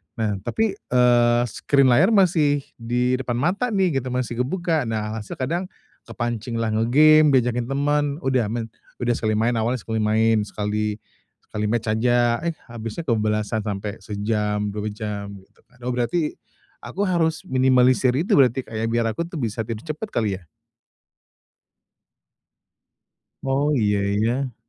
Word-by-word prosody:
Nah, 105 -3 -1
tapi, 220 - -1
eee, 120 - +3
screen 140 +2 +3
layar 190 - +4
masih 155 -7 +3 0.2
di 125 +2 0
depan 125 -2 -3
mata 180 - 0
nih, 180 -8 +2
gitu, 130 - -7
masih 125 -2 -3
kebuka. 160 0 0
Nah, 110 0 -3
se 105 - -8
kadang 170 +8 -2 0.4
kepancinglah 115 -1 -3
nge-game, 150 +8 +5
diajakin 120 -1 +1
temen. 145 +2 +1 0.2
Udah, 130 -4 +1
main 115 +1 -4 0.2
udah 120 -1 -1
sekali 110 -2 0
main 115 +3 +2
awalnya 115 +1 -1
sekali 110 -1 -2
main, 110 +1 +3
sekali 105 0 -2 0.5
sekali 105 0 -3
match 115 0 0
aja. 120 +1 +2
Eh, 170 -1 -3 0.2
habisnya 115 +7 -6
kebablasan 110 -3 0
sampai 100 0 -4
sejam, 105 +1 -2
2 105 +1 -4
jam, 105 -1 -5
gitu. - - -30 0.2
Oh 125 - -1
berarti, 125 +6 -1 0.4
aku 200 - -4
harus 165 -4 0
minimalisir 130 -1 +3
itu 160 +7 -1
berarti, 130 -1 +3
Kak, 110 -2 -7
ya, 115 - -1
biar 115 -1 0
aku 170 +8 -4
tuh 175 - -10
bisa 115 -7 -3
tidur 115 -1 -5
cepet 155 +7 -5
kali 105 - -1
ya? 85 - -24 3.0
Oh, 135 +2 +1
iya 105 -5 +2 0.3
ya. 125 +1 -1
120 Hz, 145 wpm, -23 LUFS, 110-140 Hz, 3.0 s, nge-game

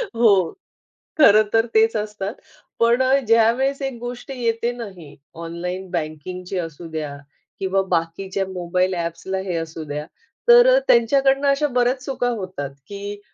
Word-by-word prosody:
हो. 200 -7 +4 0.7
खरं 215 -7 +7
तर 225 +1 +3
तेच 225 +1 +4
असतात. 210 0 -4 0.5
पण 235 +2 +4 0.2
ज्यावेळेस 235 +5 +3
एक 270 -2 -3
गोष्ट 245 +2 -7
येते 235 -2 -1
ना 240 -1 -6
ही 155 -5 -13 0.3
ऑनलाईन 180 +3 -5
बँकिंगची 180 +3 -4
असूद्या 160 -3 -5 0.4
किंवा 195 0 +1
बाकीच्या 185 +3 -1
मोबाईल 180 0 -1
ॲप्सला 170 +2 -3
हे 180 - -2
असू 165 -1 -5
द्या, 150 0 -5 0.4
तर 485 +1 +8
अ, - - +6
त्यांच्याकडून 270 +4 +4
अशा 280 +2 +3
बऱ्याच 250 +1 0
चुका 260 -2 -1
होतात 185 - -5 0.2
की 205 0 -7
200 Hz, 135 wpm, -21 LUFS, 175-240 Hz, 0.7 s, तर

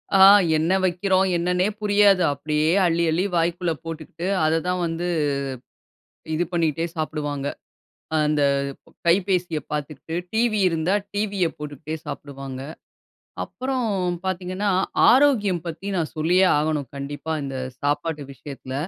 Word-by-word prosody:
ஆ. - - +5 0.4
என்ன 160 +3 +1
வைக்கிறோம். 185 +1 +2
என்னன்னே 180 +2 +1
புரியாது. 205 -2 +4
அப்டியே 150 +2 0 0.2
அள்ளி, 170 0 +2
அள்ளி 175 +4 +1
வாய்க்குள்ள 170 +1 0
போட்டுக்கிட்டு, 165 +2 -6 0.2
அத 160 +1 +2
தான் 180 0 0
வந்து 165 +1 -2 1.3
இது 170 +3 +1
பண்ணிக்கிட்டே 165 -1 0
சாப்டுவாங்க. 145 -3 -3 0.7
அ - - +3
அந்த 150 -1 +1 0.6
கைபேசிய 180 -2 +2
பார்த்துக்கிட்டு, 150 +1 -5 0.2
டிவி 220 -1 +2
இருந்தா 165 +2 0 0.2
டிவிய 205 -3 0
போட்டுக்கிட்டே 150 +1 -6
சாப்பிடுவாங்க. 135 -2 -7 0.8
அப்புறம் 260 -1 -3 0.4
பார்த்தீங்கன்னா, 185 +2 -1 0.4
ஆரோக்கியம் 235 -9 +4
பத்தி 170 +4 -6
நான் 165 -3 -2
சொல்லியே 175 +5 +3
ஆகணும். 150 -2 -1
கண்டிப்பா 145 +3 -5
இந்த 135 -1 -4 0.3
சாப்பாட்டு 150 +1 -1
விஷயத்துல. 135 -1 -9
165 Hz, 115 wpm, -23 LUFS, 150-185 Hz, 1.3 s, ஆ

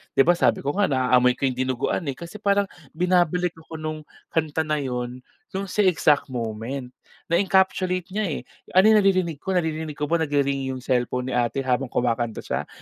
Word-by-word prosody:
'di 135 - +6
ba, 175 - +5
sabi 175 - +2
ko 140 - 0
nga 205 - +4
naaamoy 125 -2 +3
ko - - -9
yung 130 -2 0
dinuguan 130 +5 -1
eh, 135 - -2
kasi 170 +8 -9
parang 200 -1 +1 0.2
binabalik 180 0 +2 0.2
ako 160 - -8
nung 155 0 -4 0.3
kanta 160 0 0
na 155 -1 -1
yun 125 -2 -4 0.4
nung 195 -1 -3
sa - - -5
exact 150 -4 +3
moment, 125 +1 -4 0.4
na-encapsulate 185 0 +2
niya, 215 0 -1
eh. 155 - -3 0.3
Ano 195 +4 +7
naririnig 185 -7 +3
ko 190 +3 -2
naririnig 160 -3 -1
ko 150 - -5
nag-ri-ring 140 -4 +1
yung 130 - -7
cellphone 125 0 0
ni - - -3
ate 120 +3 0
habang 130 +1 0
kumakanta 120 -2 -1
siya - - -3
150 Hz, 180 wpm, -24 LUFS, 130-180 Hz, 0.4 s, Ano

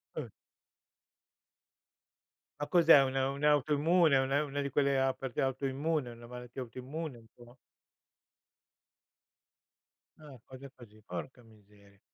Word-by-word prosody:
Oh. - - -5 2.3
Ma 145 - -2
cos'è 165 -3 +6
un 130 0 -3
un'autoimmune? 150 +3 +2
Una 135 +2 +1
una 145 -1 -5
di 140 0 -2
quelle 140 0 +1
a 135 0 +2
perché 130 -3 -6
è - - +3
autoimmune? 135 +2 -1
È - - -9
una 120 0 -13
malattia 125 +1 -9
autoimmune, 130 +4 -7
il 115 -1 -18
tuo? 120 +1 -17 2.6
Ah, 145 -5 -13
cose 130 +1 -12
così. 110 -3 -16
Porca 120 +8 -7
miseria, 100 -2 -22
135 Hz, 120 wpm, -31 LUFS, 120-145 Hz, 2.6 s, cos'è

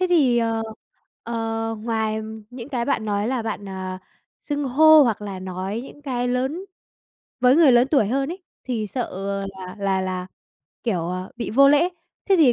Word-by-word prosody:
Thế 370 - +3
thì, 270 -9 +4
ờ, 225 -1 0 0.6
ờ, 225 -1 -2
ngoài 220 -1 -1 0.3
những 245 0 -8
cái 250 -5 -1
bạn 235 -4 0
nói 205 0 0
là 255 -2 -1
bạn, 205 -2 -4
à, 185 -1 -5 0.4
xưng 290 -1 -3
hô 310 +4 +7
hoặc 225 -5 0
là 200 -2 -5
nói 185 +3 -4
những 290 - -13
cái 245 -3 -1
lớn 265 +9 -1 0.8
với 250 +2 +5
người 315 -5 +7
lớn 245 +2 +5
tuổi 270 -9 +4
hơn 270 +4 0
ấy 370 +1 -10 0.2
thì 230 -4 -2
sợ, 245 +4 -3
ờ, 195 +1 -3
là 190 -1 -9
là 195 -1 +1
là, 185 -1 -3 0.6
kiểu, 175 -7 -1
à, 185 +1 -4
bị 235 - -4
vô 275 +5 +6
lễ, 295 +5 +5 0.4
thế 390 - +5
thì 295 -8 +6
230 Hz, 185 wpm, -23 LUFS, 200-270 Hz, 0.8 s, hô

